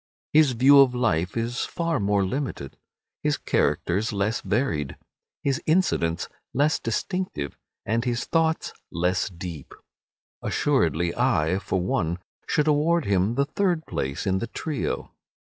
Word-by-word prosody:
His 150 -4 +5
view 135 +4 +7
of 130 -2 +5
life 90 -6 0
is 115 +2 -1
far 165 -4 -1
more 100 -1 +2
limited, 100 - -4 0.5
his - - +1
characters 100 +6 0
less 105 +3 0
varied, 75 - -1 0.5
his 140 -1 0
incidents 90 - +1 0.3
less 145 +3 +3
distinctive, 115 - -3 0.3
and 115 +3 0
his 120 -1 -1
thoughts 160 -1 +1 0.2
less 90 +3 0
deep. 85 -5 -8 0.7
Assuredly 85 +1 +1
I, 95 -8 +2
for 95 - -1
one, 85 -2 0 0.3
should 150 0 +1
award 155 +2 +3
him 100 +3 +2
the 140 +1 +2
third 175 0 0
place 70 +6 -3
in 95 -1 +1
the 115 - -3
trio. 150 +3 -3
115 Hz, 130 wpm, -25 LUFS, 90-145 Hz, 0.7 s, view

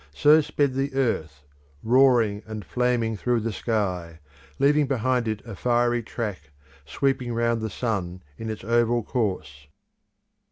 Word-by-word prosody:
So 150 +1 +6
sped 145 -2 0
the 135 +1 -2
earth, 80 - -1 0.4
roaring 120 -4 +4
and 110 -2 -6
flaming 120 -3 0
through 120 +2 0
the 115 0 -3
sky, 90 -7 -2 0.4
leaving 145 +1 +3
behind 125 -2 0
it 110 +1 -3
a 115 -4 -8
fiery 120 +2 +1
track, 105 - -5 0.4
sweeping 125 - -1
round 115 -1 +1
the 110 - -3
sun 95 -5 -3
in 110 +6 -6
its 110 -3 -6
oval 120 +1 +2
course. 90 - -3
115 Hz, 135 wpm, -25 LUFS, 105-125 Hz, 0.4 s, So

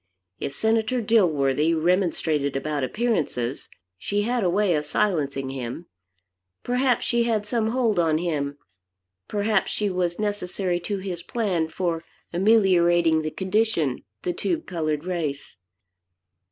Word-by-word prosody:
If - - -3
Senator 220 - +1
Dilworthy 165 - +3
remonstrated 160 -4 +1
about 145 0 -2
appearances, 150 - -1 0.3
she 205 - -1
had 240 0 0
a 180 - +3
way 195 0 +2
of 150 -1 -1
silencing 140 -8 0
him. 130 +5 -5 0.8
Perhaps 250 0 +1
she 235 -1 +2
had 220 -3 0
some 220 +1 0
hold 225 -4 +1
on 160 -2 +3
him, 145 -4 -2 0.7
perhaps 210 0 +1
she 205 -2 -1
was 180 -1 -1
necessary 195 -3 -1
to 200 +4 -3
his 185 -3 -5
plan 185 -7 -1
for 165 0 -2 0.3
ameliorating 175 -5 +4
the 155 - -2
condition 190 - 0
of - - -19 0.3
the 335 -3 -1
colored 155 -3 -2
race. 155 - -3
180 Hz, 125 wpm, -24 LUFS, 155-210 Hz, 0.8 s, ameliorating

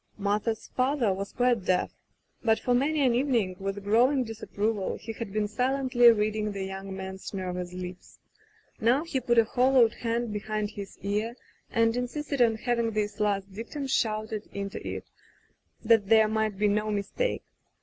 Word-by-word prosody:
Martha's 210 +2 -1
father 255 -5 +2
was 195 +1 -5
quite 245 -4 +1
deaf, 180 0 +1 0.5
but 225 -2 +4
for 245 - +1
many 285 +3 +2
an 250 - +4
evening, 235 -7 +1
with 195 +1 -4
growing 250 +6 +3
disapproval, 220 -2 -2
he 225 +1 -7
had 225 -3 -6
been 210 0 0
silently 250 +1 +4
reading 215 -1 0
the 195 -1 -4
young 190 0 -6
man's 190 +1 -7
nervous 180 -1 -4
lips. 180 0 -8 0.6
Now 245 +7 +3
he 320 -5 -2
put 240 -1 +1
a 230 - +8
hollowed 250 -1 +4
hand 230 -1 -2
behind 210 0 -2
his 200 -2 -8
ear 210 +4 -1 0.3
and 230 0 +2
insisted 275 +3 -2
on 230 -2 +4
having 235 0 0
this 210 0 -2
last 200 -2 0
dictum 235 +7 -5
shouted 215 -4 -1
into 200 0 -5
it, - - -5 0.8
that 220 -3 +4
there 220 -1 +6
might 215 -2 -1
be 210 +1 +2
no 210 +1 +1
mistake. 210 - -1
220 Hz, 160 wpm, -28 LUFS, 200-245 Hz, 0.8 s, a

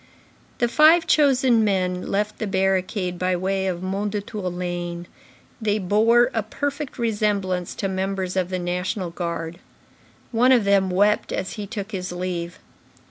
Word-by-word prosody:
The 240 - +2
five 310 +7 +5
chosen 265 -7 +4
men 185 -3 0
left 210 +2 -1
the 220 - -2
barricade 190 -1 0
by 185 0 +1
way 190 +1 -1
of 175 -2 -2
Mondétour 200 0 -3
lane; 175 -1 -4 0.6
they 210 -1 +1
bore 225 +5 +3
a 225 - +1
perfect 285 +6 -4
resemblance 205 -6 -1
to 195 - -2
members 190 -1 -2
of 185 -1 0
the 185 - -2
National 180 +1 -2
Guard. 170 -1 -4 0.7
One 245 +2 +4
of 245 -4 +5
them 200 -1 +3
wept 205 +3 +2
as 185 - -3
he 210 -2 -6
took 210 -1 -6
his 185 -3 -4
leave. 175 -1 -4
195 Hz, 145 wpm, -23 LUFS, 180-220 Hz, 0.7 s, five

